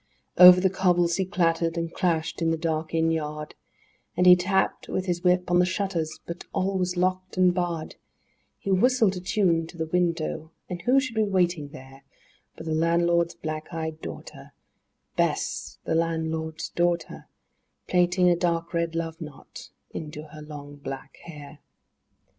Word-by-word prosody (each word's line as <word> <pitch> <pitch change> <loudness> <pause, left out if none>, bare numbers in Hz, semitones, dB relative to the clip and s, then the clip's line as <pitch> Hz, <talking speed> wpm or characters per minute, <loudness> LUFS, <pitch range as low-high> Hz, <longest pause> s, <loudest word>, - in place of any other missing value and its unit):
III 180 - +12
Over 180 0 +9
the 190 - +3
cobbles 175 -3 +2
he 190 - 0
clattered 170 -3 0
and 165 0 -3
clashed 165 -2 -1
in 165 - +2
the 165 - +1
dark 160 -1 -2
inn 165 0 +2
yard, 150 -1 -4 0.6
And 180 - +3
he 180 0 +10
tapped 190 +2 0
with 185 - -2
his 175 -1 -2
whip 180 0 +2
on 175 - +4
the - - +5
shutters, 175 -5 -2
but 170 +1 -7
all 195 0 0
was 180 0 -1
locked 185 +1 -1
and 180 -1 +4
barred; 175 -3 -3 0.6
He 195 - -4
whistled 220 0 +3
a - - -4
tune 180 -3 +1
to 170 - -13
the 160 - -2
window, 165 -2 -1 0.2
and 175 -2 -6
who 255 +8 +4
should 260 -3 -3
be 220 - +1
waiting 175 -7 +1
there 135 -2 -13 0.5
But 160 - -10
the 160 - -2
landlord's 170 +1 +2
black 155 0 -6
eyed 160 -1 -5
daughter, - - -9 0.6
Bess, - - -1
the - - -2
landlord's 160 -1 -2
daughter, 175 -2 -1 0.6
Plaiting 180 0 +3
a 175 - +5
dark 170 0 -1
red 170 -1 -1
love 165 0 -4
knot 150 -4 -10 0.2
into 150 0 -7
her 155 0 -11
long 145 -1 -10
black 135 -1 -8
hair. 150 -2 -11
170 Hz, 165 wpm, -26 LUFS, 160-180 Hz, 0.6 s, III